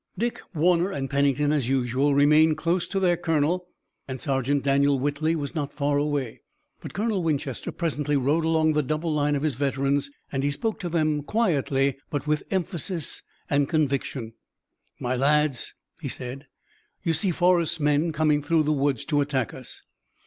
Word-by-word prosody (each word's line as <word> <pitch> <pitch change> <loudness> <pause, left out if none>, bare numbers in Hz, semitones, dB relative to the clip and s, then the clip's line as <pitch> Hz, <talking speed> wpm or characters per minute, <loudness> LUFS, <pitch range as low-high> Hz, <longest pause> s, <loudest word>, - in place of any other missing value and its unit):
Dick, 235 +4 -2
Warner, 175 +3 +3
and 140 -7 -4
Pennington, 140 +1 +2
as 140 -5 0
usual, 135 +2 +1
remained 150 +2 +5
close 170 +1 0
to 195 - -1
their 180 -2 +3
colonel, 165 +2 0 0.4
and 130 -1 -5
Sergeant 135 +1 0
Daniel 140 0 +3
Whitley 145 +4 0
was 145 -3 -4
not 145 -4 -3
far 145 0 +1
away. 145 -5 -2 0.4
But - - -9
Colonel 210 -1 0
Winchester 145 -5 -2
presently 150 -3 -1
rode 145 +5 +1
along 160 -1 +2
the 150 - +2
double 155 +3 -2
line 145 -1 +1
of 140 - -2
his 155 -3 +1
veterans, 140 +1 0 0.2
and 135 - -1
he 140 - +1
spoke 215 +10 -2
to 175 - -4
them 155 -3 +1
quietly 140 - +1
but 145 -1 -3
with 150 -1 +1
emphasis 175 -2 -3 0.3
and 145 -1 +1
conviction: 140 -6 -1 0.7
"My 125 +1 -1
lads," 145 0 +1 0.3
he - - -4
said, 130 +3 -6 0.6
"you 165 -3 +1
see 190 +5 +1
Forrest's 175 -1 +2
men 150 +2 +2
coming 155 -1 +2
through 160 +2 +2
the 155 +1 +1
woods 140 -4 0
to 145 -1 +1
attack 135 -7 -1
us. 130 -2 -9
145 Hz, 170 wpm, -25 LUFS, 140-160 Hz, 0.7 s, remained